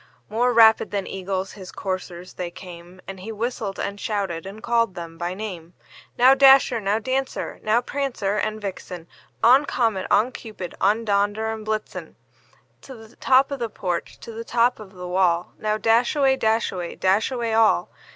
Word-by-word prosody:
More 245 +3 +1
rapid 225 -2 +5
than 200 -2 -2
eagles 190 0 -4
his 190 -3 -10
coursers 185 -2 -5
they 180 -1 -5
came, 175 +1 -12
And 195 -1 -7
he 210 +5 -7
whistled, 220 -2 -4
and 200 0 -4
shouted, 195 -6 -3
and 210 +3 -10
called 230 -4 +1
them 170 -1 -8
by 175 +2 -4
name; 180 -5 -7 0.4
"Now, 255 +2 +7
Dasher! 270 -3 +6
now, 200 +1 +1
Dancer! 260 +3 -3
now, 220 +3 +2
Prancer 245 -7 -2
and 215 0 -2
Vixen! 185 -4 -7 0.4
On! 255 +5 +7
Comet, 225 -9 -1
on! 220 +5 +3
Cupid, 210 -8 -8
on! 215 +4 +2
Dunder 205 +2 0
and 220 -1 -7
Blitzen 215 0 -4 0.7
To 265 - -11
the 225 0 -15
top 265 +2 +3
of 280 - -4
the 235 -1 -2
porch, 180 -4 -4
to 230 - -9
the 225 +1 -7
top 240 +1 +1
of 205 -2 -12
the 180 -1 -8
wall! 180 -1 +1
Now, 215 0 0
dash 230 +5 +2
away, 270 -2 +3
dash 225 -2 +1
away, 175 -2 -5
dash 195 +4 +2
away 235 -3 -2
all!" 220 - +3
215 Hz, 180 wpm, -23 LUFS, 185-235 Hz, 0.7 s, Now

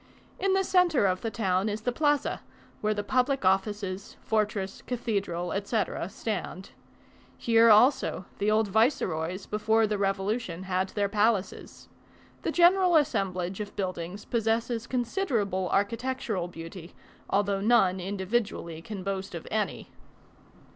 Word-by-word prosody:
In 390 0 +2
the 385 0 +3
centre 355 - +3
of 185 -1 +1
the 225 - -2
town 195 -2 0
is 210 +1 -3
the 245 - -1
Plaza, 290 +2 +1 0.4
where 215 0 +1
the 205 - -2
public 255 +1 +1
offices, 195 +1 0
fortress, 210 -3 -1
cathedral, 200 -8 -2
etc., 200 -2 -2
stand. 205 -3 -5 0.7
Here 230 0 +5
also, 215 -3 +4
the 205 - +1
old 215 0 +3
viceroys, 190 - 0
before 220 +1 +2
the 210 -1 -2
revolution, 195 -1 -1
had 190 0 -1
their 205 -1 0
palaces. 210 -1 -1 0.5
The - - -1
general 355 0 +5
assemblage 190 - 0
of 210 -1 -6
buildings 185 0 -4
possesses 230 +1 -1
considerable 235 - -1
architectural 220 -2 -1
beauty, 165 +1 -10 0.3
although 200 0 +1
none 195 -4 +3
individually 190 -3 -2
can 195 +1 -7
boast 195 -1 -4
of 170 - -7
any. 215 -1 -2
205 Hz, 125 wpm, -28 LUFS, 190-230 Hz, 0.7 s, Here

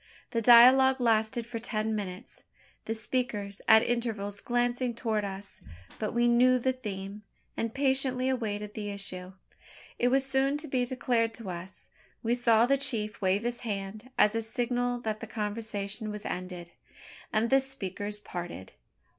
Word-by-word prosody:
The 230 - 0
dialogue 255 +3 +7
lasted 225 0 +1
for 235 0 -5
ten 220 -1 -2
minutes, 185 -3 -6 0.4
the 225 - -2
speakers 210 -4 -2
at 220 +1 +7
intervals 220 -4 -2
glancing 245 0 0
towards 220 -3 -1
us; 195 0 -8 0.4
but 215 - -2
we 240 +1 +2
knew 250 +2 +5
the 260 +1 +1
theme, 205 -4 -6 0.3
and 230 -1 -2
patiently 265 -1 +1
awaited 210 -5 -2
the 210 -1 -4
issue. 190 -2 -6 0.7
It 245 - +3
was 265 +2 +3
soon 270 +1 +1
to 305 +1 -8
be 255 -3 0
declared 240 -3 0
to 215 -6 -6
us. 175 +2 -9 0.4
We 230 +1 +1
saw 235 -2 +4
the 275 +2 +2
chief 215 -7 -1
wave 195 +2 +2
his 240 0 -2
hand 210 +1 -5
as 210 - +5
a 225 - 0
signal 245 +1 -1
that 215 -2 -3
the - - -7
conversation 210 0 -3
was 210 0 -6
ended; 180 -1 -5 0.6
and 225 +2 +1
the 270 - +6
speakers 210 -5 -3
parted. 175 - -7
225 Hz, 155 wpm, -29 LUFS, 205-245 Hz, 0.7 s, dialogue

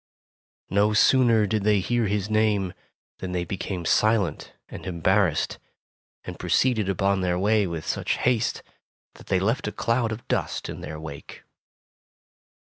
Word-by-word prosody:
'' - - - 0.3
No 100 +2 +3
sooner 115 -1 +4
did 105 0 -1
they 105 -1 +3
hear 120 +3 0
his 100 0 -1
name, 105 -4 +1 0.5
than 90 -1 -5
they 90 -1 -1
became 90 -1 -4
silent 105 -7 +1 0.2
arid - - -8
embarrassed, 90 -1 +1 0.6
and - - -8
proceeded 110 -6 +1
upon 95 +1 +1
their 90 -1 0
way 105 +1 +2
with 80 -2 -5
such - - -1
haste 120 -2 0 0.5
that - - -16
they 95 - +2
left 115 +9 0
a - - -2
cloud 115 -1 0
of 110 +2 -7
dust - - -2
in - - -7
their 80 0 -7
wake. 75 -3 -9
100 Hz, 150 wpm, -25 LUFS, 90-110 Hz, 0.6 s, sooner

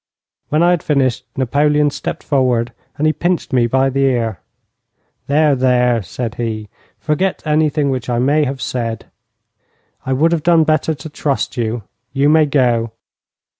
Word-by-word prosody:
When 155 +3 +2
I 175 - +4
had 175 -3 +1
finished 130 -3 0
Napoleon 145 +3 +2
stepped - - -5
forward 125 -4 +1 0.2
and 150 - 0
he 155 - +3
pinched 175 -3 -2
me 120 -2 +3
by 135 +2 +1
the 135 +1 0
ear. 115 -8 0 0.9
'There, 150 +1 +3
there!' 125 -2 +2
said 110 +5 -5
he. 110 -2 -4 0.3
'Forget 170 +5 -1
anything 150 -2 +1
which 125 -2 -4
I 120 - 0
may 145 +5 +2
have 135 -1 -4
said. 115 -3 -3 1.0
I 130 - -1
would 155 +6 +2
have 170 -2 0
done 165 0 +4
better 155 0 +1
to 140 +2 -9
trust 145 -3 -2
you. 115 -2 -2 0.3
You 140 +1 +2
may 155 0 +4
go.' 120 -5 +1
135 Hz, 160 wpm, -17 LUFS, 120-150 Hz, 1.0 s, I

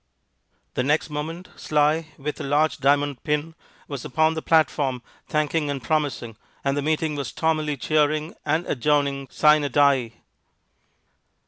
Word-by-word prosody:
The - - 0
next 150 +4 0
moment 160 +5 -5
Sly, 150 +2 +1
with 150 +1 -5
a - - -4
large 145 +3 +1
diamond 140 0 +1
pin, 150 +1 -1 0.3
was 140 -4 -6
upon 155 +4 +2
the 160 - -4
platform 145 -6 +1 0.2
thanking 150 0 0
and 140 -1 -2
promising, 130 -4 -2 0.3
and 140 0 +1
the 145 - 0
meeting 155 +1 0
was 140 -3 -3
stormily 155 -2 -1
cheering 155 +2 +1
and 155 +3 0
adjourning 140 0 0
sine 150 -2 +3
die. 135 -5 +3
150 Hz, 135 wpm, -24 LUFS, 140-155 Hz, 0.3 s, sine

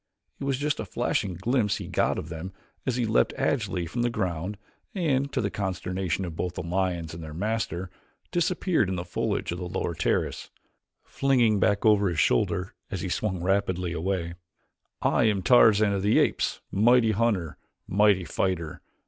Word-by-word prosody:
It - - -4
was 135 -2 0
just 145 +1 -1
a 110 - -3
flashing 95 -1 -1
glimpse 110 +3 +1
he - - -6
got - - +1
of 80 - -5
them 85 +3 -6 0.3
as 130 - +1
he 125 -2 0
leaped 110 - +2
agilely 105 -10 0
from 120 +9 -3
the 120 - +2
ground 95 -3 -3 0.4
and, 140 -6 0
to - - 0
the 100 -2 -1
consternation 95 -2 -2
of 85 -3 -6
both 90 +1 -3
the - - -4
lions 85 -2 -1
and 85 0 -7
their 75 -1 -8
master, 95 -3 -2 0.4
disappeared 175 - +1
in 95 - -1
the 85 0 -4
foliage 85 - -2
of 85 - -4
the 90 -1 -5
lower 85 - -2
terrace, - - -1 0.5
flinging 120 -6 +2
back 100 +2 +2
over 105 -3 +5
his 85 -3 -2
shoulder 90 +10 +1 0.2
as 95 - -4
he 95 - -3
swung 95 -2 -2
rapidly 90 -2 0
away: 85 0 -2 0.7
"I - - +3
am 100 -4 +1
Tarzan 110 -3 +5
of 100 - -1
the 105 +2 +3
Apes; - - +1
mighty 115 +2 +4
hunter; 100 -7 0 0.3
mighty 100 -2 +3
fighter! 85 -2 -2
95 Hz, 175 wpm, -26 LUFS, 90-110 Hz, 0.7 s, over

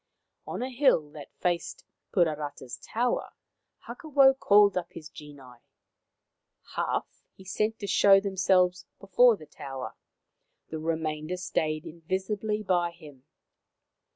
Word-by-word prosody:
On - - -4
a 260 - -4
hill 245 - +2
that 150 -1 -11
faced 175 -1 -2 0.3
Puarata's 150 -7 -1
tower 240 +2 -2 0.5
Hakawau 275 -4 +3
called 205 -1 +5
up 175 -2 -3
his 155 -2 -10
genii. 140 -5 -13 1.2
Half - - -3
he 190 - -16
sent 215 +4 -1
to 205 - -6
show 195 0 +5
them 195 -1 -4
selves 180 -1 +2
before 220 +4 +4
the 155 - -13
tower, 135 -5 -8 0.8
the 160 - -5
remainder 160 +1 -3
stayed 155 -3 -2
invisibly 190 +6 -3
by 175 -3 +1
him. 150 -6 -15
180 Hz, 120 wpm, -28 LUFS, 155-200 Hz, 1.2 s, called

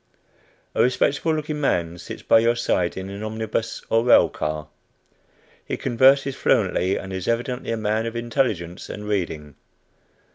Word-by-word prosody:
A - - +2
respectable 140 +5 +2
looking 150 -1 -3
man 85 - 0
sits - - -8
by - - +5
your 115 +1 +2
side 90 -7 0
in 95 0 -5
an 100 +1 -7
omnibus 110 +1 -3
or 115 0 +2
rail 120 - +6
car. 75 0 -4 1.0
He - - -4
converses 135 +3 +3
fluently, 95 +2 +1
and 95 0 -7
is 95 -2 -4
evidently 125 +2 -2
a 115 - -1
man 110 +1 0
of 115 - -5
intelligence 115 -8 -2
and 105 0 -7
reading. 80 -8 -3
110 Hz, 150 wpm, -23 LUFS, 95-125 Hz, 1.0 s, rail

